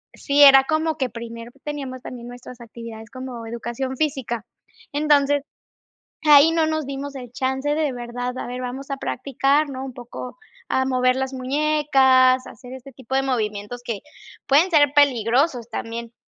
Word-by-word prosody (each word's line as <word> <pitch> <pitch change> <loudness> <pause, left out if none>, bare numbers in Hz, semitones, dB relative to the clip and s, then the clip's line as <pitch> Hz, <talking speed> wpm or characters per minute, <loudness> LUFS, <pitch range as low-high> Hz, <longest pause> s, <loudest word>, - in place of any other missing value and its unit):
sí 280 +1 +1
era 270 -1 +9
como 315 0 0
que 260 -4 -1
primero 230 0 -8
teníamos 275 -4 -5
también 240 -1 -9
nuestras 245 0 -11
actividades 230 -1 -10
como 250 -1 -7
educación 240 +3 -4
física, 255 -6 -2 0.5
entonces, 290 -1 +3 0.8
ahí 295 +1 +8
no 330 -1 +2
nos 315 -1 -1
dimos 275 +1 -6
el 245 -3 -8
chance 265 +2 -1
de 305 -2 0
verdad, 245 +1 -5
a - - -5
ver, 250 +1 -5
vamos 260 +3 -6
a 275 - -3
practicar, 275 +3 0
¿no?, 265 -1 -6
un 260 - -8
poco 245 +2 -9 0.3
a 260 - +1
mover 255 -1 +2
las 265 0 -2
muñecas, 265 -2 +3
a - - -9
hacer 250 -1 -12
este 260 0 -11
tipo 260 0 -9
de 270 - +3
movimientos 220 -2 -3
que 230 -4 -4 0.5
pueden 300 +7 +4
ser 290 -3 +4
peligrosos 250 -1 +2
también, 230 +1 -6
260 Hz, 160 wpm, -22 LUFS, 245-285 Hz, 0.8 s, era